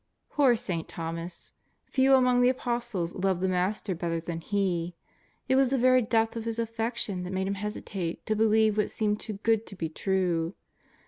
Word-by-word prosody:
Poor 270 -5 +4
St. 185 -8 -3
Thomas! 165 +1 -6 0.3
few 265 0 +4
among 250 -1 +4
the 245 - +5
Apostles 240 -8 -2
loved 190 -1 0
the 190 - +1
Master 185 +2 0
better 165 -1 -2
than 165 0 -5
he. 180 -3 -1 0.5
It 260 - +3
was 265 -1 +4
the 270 - +1
very 255 +1 +5
depth 225 0 +1
of 230 -1 -4
his 230 0 -2
affection 225 -4 -2
that 180 +1 -5
made 190 0 0
him 195 - -1
hesitate 195 -4 -4
to 215 - 0
believe 220 0 +3
what 210 - +1
seemed 210 -1 -1
too 215 - -5
good 225 -1 +2
to 195 - -8
be 165 -3 -3
true. 175 -1 0
210 Hz, 185 wpm, -28 LUFS, 180-230 Hz, 0.5 s, the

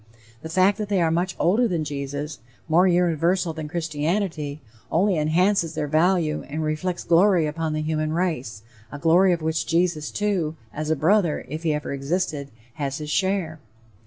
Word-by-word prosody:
The 160 - -7
fact 190 +5 +3
that 210 -1 -3
they 200 -2 +2
are 165 -2 +2
much 180 +2 0
older 220 +8 +3
than 170 -6 -1
Jesus, 145 +1 -5 0.3
more 170 +4 +4
universal 175 0 +2
than 155 -1 -6
Christianity, 160 -1 -2 0.3
only 190 +3 +2
enhances 165 +2 +1
their 150 - -1
value 160 0 +2
and 155 +2 -3
reflects 155 +4 -2
glory 175 0 +4
upon 155 +1 -2
the 155 0 -2
human 155 0 -1
race, 145 - -2 0.3
a 145 - -6
glory 170 +5 +4
of 170 -2 -1
which 160 0 -1
Jesus, 165 -3 +1
too, 190 -7 -1 0.2
as 155 +1 -4
a 160 - +3
brother, 170 +2 +2
if 155 +4 -5
he 165 -2 +1
ever 150 -1 -3
existed, 140 0 -2 0.3
has 140 0 -2
his 150 -1 -5
share. 190 -4 0
160 Hz, 170 wpm, -24 LUFS, 155-180 Hz, 0.3 s, more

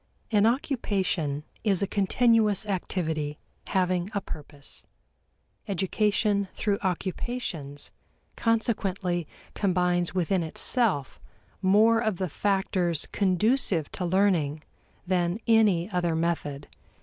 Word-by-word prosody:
An 210 0 +4
occupation 195 - -1 0.2
is 200 -3 +3
a - - 0
continuous 215 +1 +2
activity 160 -6 -2 0.3
having 185 -1 0
a - - +2
purpose. 145 -4 -9 0.8
Education 200 +1 +1
through 205 -2 0
occupations 180 - -4 0.4
consequently 195 -7 0 0.3
combines 180 -2 +1
within 185 +1 +1
itself 165 - 0 0.4
more 215 +4 +5
of 220 -5 0
the 185 -1 -2
factors 185 -3 0
conducive 195 - +1
to 185 - -4
learning 170 -5 +1 0.4
than 175 0 +1
any 210 -7 +4
other 175 -3 0
method. 160 -4 -2
185 Hz, 95 wpm, -27 LUFS, 170-205 Hz, 0.8 s, more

